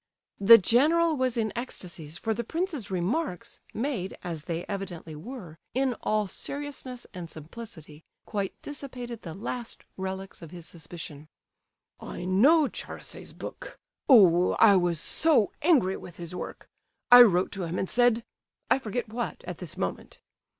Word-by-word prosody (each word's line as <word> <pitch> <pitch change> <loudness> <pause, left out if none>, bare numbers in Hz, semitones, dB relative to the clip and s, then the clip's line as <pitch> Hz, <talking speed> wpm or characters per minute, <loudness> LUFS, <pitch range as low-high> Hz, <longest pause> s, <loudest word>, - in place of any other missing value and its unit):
The 220 +3 +10
general 310 - +3
was 255 -3 0
in 220 -2 0
ecstasies, 170 - -6
for 225 - -1
the 235 +2 -3
prince's 320 - -3
remarks, 185 - -2
made, 225 -7 -3
as 165 -4 -5
they 170 -1 -3
evidently 180 -5 -6
were, 170 - -9 0.2
in 260 -1 +2
all 215 -1 +1
seriousness 275 +1 -6
and 175 -3 -7
simplicity, 160 -2 -10 0.2
quite 200 -3 -3
dissipated 250 -5 -7
the 165 -3 -7
last 235 +4 -5
relics 190 0 -5
of 165 - -9
his 175 -1 -9
suspicion. 155 -2 -8 0.7
"I 175 - -7
know 275 - +5
Charasse's - - -7
book! - - -8 0.3
Oh! 180 -8 +7
I 210 -3 +6
was 175 -3 +2
so 295 - +3
angry 265 - +3
with 170 - -11
his 170 0 -6
work! 180 - -7 0.4
I 245 0 +12
wrote 185 -6 +5
to 190 -3 -3
him 170 +2 -3
and 190 - -1
said—I 240 +3 0
forget 240 0 -3
what, 240 0 -4
at - - -7
this - - -8
moment. - - -4
205 Hz, 145 wpm, -28 LUFS, 175-250 Hz, 0.7 s, I